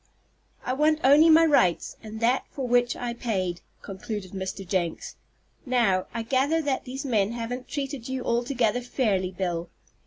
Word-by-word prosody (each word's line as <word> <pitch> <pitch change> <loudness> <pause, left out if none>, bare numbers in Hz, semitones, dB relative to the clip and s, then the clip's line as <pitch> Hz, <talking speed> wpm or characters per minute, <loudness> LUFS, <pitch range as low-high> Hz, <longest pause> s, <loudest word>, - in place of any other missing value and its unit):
"I 255 - 0
want 305 +3 +2
only 290 +5 +7
my 325 +1 +7
rights, 185 - +2
and 220 0 -8
that 245 +3 +2
for 265 -3 -4
which 245 0 +2
I 245 -1 -4
paid," 185 -7 -2 0.2
concluded 195 0 -6
Mr. 190 0 -5
Jenks. 175 -3 -2 0.5
"Now, 235 -8 +1
I 230 0 -4
gather 270 +7 +1
that 285 -4 -2
these 265 +3 -6
men 220 -4 +1
haven't 240 +2 -5
treated 275 -4 -5
you 260 -1 -3
altogether 240 -1 0
fairly, 210 -7 0
Bill." 175 -2 -3
240 Hz, 155 wpm, -26 LUFS, 195-265 Hz, 0.5 s, only